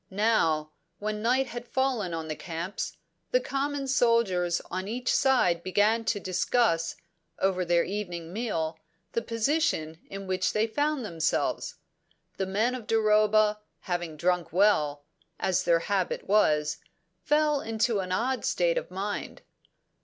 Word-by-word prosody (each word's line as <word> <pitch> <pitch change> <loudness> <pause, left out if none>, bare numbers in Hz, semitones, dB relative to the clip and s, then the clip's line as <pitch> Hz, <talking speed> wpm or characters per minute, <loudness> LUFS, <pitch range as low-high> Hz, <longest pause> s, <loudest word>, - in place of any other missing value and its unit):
Now, 190 -7 +1 0.3
when 210 0 -3
night 255 +4 +2
had 240 -1 -7
fallen 255 -9 0
on 165 -1 -4
the 155 - -3
camps, 170 +4 -5 0.3
the - - +3
common 280 - -2
soldiers 230 -9 +2
on 185 +1 -3
each 245 +4 -1
side 185 -11 +3
began 210 +5 +2
to 215 -2 0
discuss, 185 -2 +1 0.4
over 190 -1 +1
their 170 -1 +3
evening 175 -4 -5
meal, 165 -8 -2 0.3
the 230 - -1
position 230 - 0
in 195 0 -6
which 185 -1 0
they 215 +1 +2
found 290 +2 -1
themselves. 165 -5 -1 0.6
The 190 - -1
men 215 +6 +1
of 250 -4 -6
Duroba, 215 -1 +3 0.2
having 175 -4 -3
drunk 175 +1 0
well, 155 -6 +2 0.4
as 185 -2 +1
their 170 -1 +4
habit 195 0 -1
was, 150 -7 +3 0.5
fell 300 -1 +2
into 225 -1 0
an 185 -1 -4
odd 250 +7 0
state - - +2
of - - -11
mind. 200 +2 -4
205 Hz, 140 wpm, -28 LUFS, 175-235 Hz, 0.6 s, their